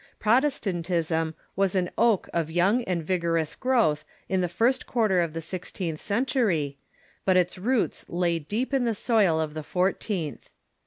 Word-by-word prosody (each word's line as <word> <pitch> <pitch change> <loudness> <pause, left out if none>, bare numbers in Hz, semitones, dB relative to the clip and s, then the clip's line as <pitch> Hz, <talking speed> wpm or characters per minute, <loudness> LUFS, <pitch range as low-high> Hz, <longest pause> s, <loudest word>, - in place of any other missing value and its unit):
Protestantism 175 - +1 0.2
Avas 195 -1 +1
an 180 -1 0
oak 225 -5 +3
of 165 -2 0
young 190 +9 +2
and 175 -3 -1
vigorous 165 -2 0
growth 230 - +1 0.2
in 190 -1 +1
the 180 - 0
first 235 +9 +1
quarter 215 -7 +2
of 165 -2 -2
the 165 0 -5
sixteenth 175 -1 -5
century, 200 - 0 0.4
but 185 -1 +3
its 180 +1 +1
roots 235 +4 0
lay 170 -1 0
deep 215 - -3
in 265 -3 +2
the 230 -2 0
soil 205 -8 +2
of 155 -1 -2
the 155 - -4
fourteenth. 180 - -2
180 Hz, 155 wpm, -26 LUFS, 165-220 Hz, 0.4 s, oak